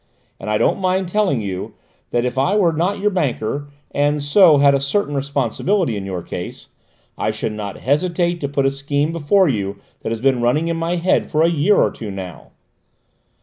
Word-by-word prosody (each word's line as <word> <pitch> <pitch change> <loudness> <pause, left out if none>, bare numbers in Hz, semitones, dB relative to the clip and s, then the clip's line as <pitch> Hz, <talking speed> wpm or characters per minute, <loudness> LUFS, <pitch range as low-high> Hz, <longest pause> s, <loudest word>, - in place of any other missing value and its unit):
"And - - -6
I 105 - +2
don't - - +1
mind 185 0 0
telling 190 - +1
you 95 -2 -5 0.3
that 120 0 0
if 125 - -2
I 135 +10 +1
were 180 -6 +3
not 175 +6 0
your 210 +1 +1
banker, 145 - -2 0.2
and 145 +1 +1
so 155 +1 +6
had 140 0 +5
a 140 - +2
certain 145 +4 -1
responsibility 140 - 0
in 100 -1 -5
your 90 -3 -4
case, - - -7 0.5
I - - 0
should 110 - -3
not 105 -2 -6
hesitate 170 +4 0
to 140 - -2
put 140 -1 0
a 135 - +3
scheme 145 +2 -1
before 170 +4 +3
you 100 -6 -2 0.2
that - - -4
has 115 - -2
been 130 0 +2
running 150 +8 +1
in 170 - 0
my 165 +2 -1
head 180 +1 +1
for 155 +1 +2
a 165 - +4
year 170 +6 +3
or - - +3
two 110 - -7
now." 95 -3 -8
145 Hz, 200 wpm, -19 LUFS, 120-175 Hz, 0.5 s, so